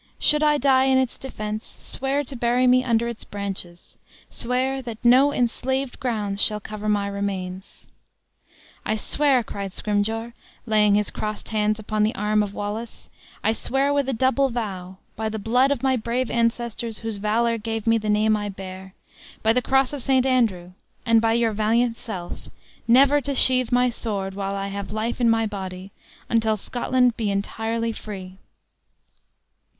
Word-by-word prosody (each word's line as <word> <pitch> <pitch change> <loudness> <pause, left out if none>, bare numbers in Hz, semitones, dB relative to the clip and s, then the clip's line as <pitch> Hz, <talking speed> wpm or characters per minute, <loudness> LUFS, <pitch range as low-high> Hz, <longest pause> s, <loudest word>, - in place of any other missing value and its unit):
Should 300 0 +3
I 300 -1 +4
die 265 -1 +4
in 265 0 +4
its 260 -2 0
defense, 215 -4 -6
swear 275 +2 -2
to 275 0 -8
bury 245 +1 +2
me 255 0 +5
under 235 -2 +1
its 235 -1 -5
branches; 195 -4 -7 0.3
swear 260 +2 -1
that 235 -3 -7
no 260 +4 +6
enslaved 260 +1 -1
grounds 210 -5 -1
shall 210 0 +1
cover 215 0 -5
my 205 -1 +1
remains." 195 -2 -5 1.0
"I 215 - 0
swear," 265 +3 +2
cried 200 -3 -6
Scrymgeour, 220 +3 -1 0.3
laying 210 -2 +4
his 210 0 0
crossed 215 0 -5
hands 215 -1 +1
upon 215 0 -2
the 215 +1 +2
arm 210 +1 +1
of 200 -1 -3
Wallace; 215 +3 -6 0.3
"I 220 - +3
swear 270 +5 0
with 280 -2 +1
a - - +2
double 260 +3 +2
vow; 190 -6 -5 0.2
by 220 0 -2
the 220 - -4
blood 245 +6 +2
of 280 -2 -1
my 260 -1 +3
brave 235 +2 -2
ancestors, 235 -1 -1
whose 225 -2 -2
valor 230 +3 +1
gave 225 0 -4
me 225 0 +3
the 215 0 -3
name 215 +1 +3
I 205 -1 -3
bear; 190 -1 -9 0.5
by 220 +1 +4
the 250 - +2
cross 270 +1 +2
of 285 - -3
St. 260 0 +2
Andrew; 220 -9 +1 0.3
and 230 -2 +4
by 225 0 +2
your 230 -1 +2
valiant 230 +3 +1
self, 185 -6 -7 0.4
never 275 +4 +5
to 280 +1 -3
sheath 255 -1 +3
my 250 0 +4
sword, 200 -4 -3
while 195 0 -3
I 195 0 -3
have 200 0 -5
life 220 +3 -2
in 235 - +4
my 225 0 +3
body, 190 -2 -6 0.4
until 220 -1 +1
Scotland 250 +2 +1
be 220 -3 -1
entirely 225 +3 -2
free!" 190 -4 -8
225 Hz, 170 wpm, -23 LUFS, 205-250 Hz, 1.0 s, no